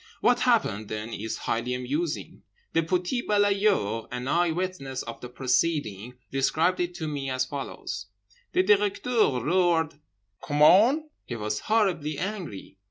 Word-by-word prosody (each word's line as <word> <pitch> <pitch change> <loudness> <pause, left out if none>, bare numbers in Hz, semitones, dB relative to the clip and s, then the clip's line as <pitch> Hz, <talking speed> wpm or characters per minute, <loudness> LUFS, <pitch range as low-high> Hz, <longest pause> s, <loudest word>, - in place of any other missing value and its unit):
What 245 0 +3
happened 210 - +1
then 110 +1 -4
is 110 +2 -4
highly 120 +2 -2
amusing. 145 +6 -3 0.3
The 165 - +3
petit 180 +8 0
balayeur, 200 - +2
an 125 +1 -5
eye 175 +4 +2
witness 160 -7 -3
of 115 0 -8
the 125 - -7
proceeding, 125 -4 -1 0.2
described 155 +7 +1
it 175 0 -2
to 160 - -4
me 140 -3 -3
as 130 0 0
follows: 130 -7 -6 0.5
"The 185 - +4
Directeur 205 - +2
roared 165 -3 +2 0.4
'COMMENT?' 195 - +5 0.2
He 120 - -4
was 105 -1 -2
horribly 180 -9 +1
angry. 180 - -5
155 Hz, 135 wpm, -27 LUFS, 125-185 Hz, 0.5 s, COMMENT